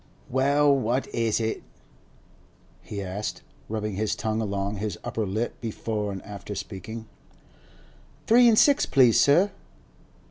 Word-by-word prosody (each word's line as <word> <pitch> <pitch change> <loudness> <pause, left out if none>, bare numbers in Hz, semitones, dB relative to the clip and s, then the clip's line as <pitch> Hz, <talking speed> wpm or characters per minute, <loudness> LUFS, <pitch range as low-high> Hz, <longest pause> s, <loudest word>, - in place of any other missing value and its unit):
'Well, 140 +2 +3
what 130 0 0
is 115 -2 +1
it?' 110 -1 -2 1.2
he 100 -2 -6
asked, 95 +3 -5 0.3
rubbing 105 -1 -3
his 110 0 0
tongue 110 0 -2
along 100 -1 -2
his 105 -2 -3
upper 110 -2 -2
lip 110 +5 -3
before 110 -2 -3
and 95 -1 -7
after 105 0 -7
speaking. 100 +3 -7 1.2
'Three 240 +1 +6
an' 225 - +5
six, 280 +5 +4
please, 125 -4 +5
sir. 175 +8 +4
110 Hz, 130 wpm, -26 LUFS, 105-130 Hz, 1.2 s, Three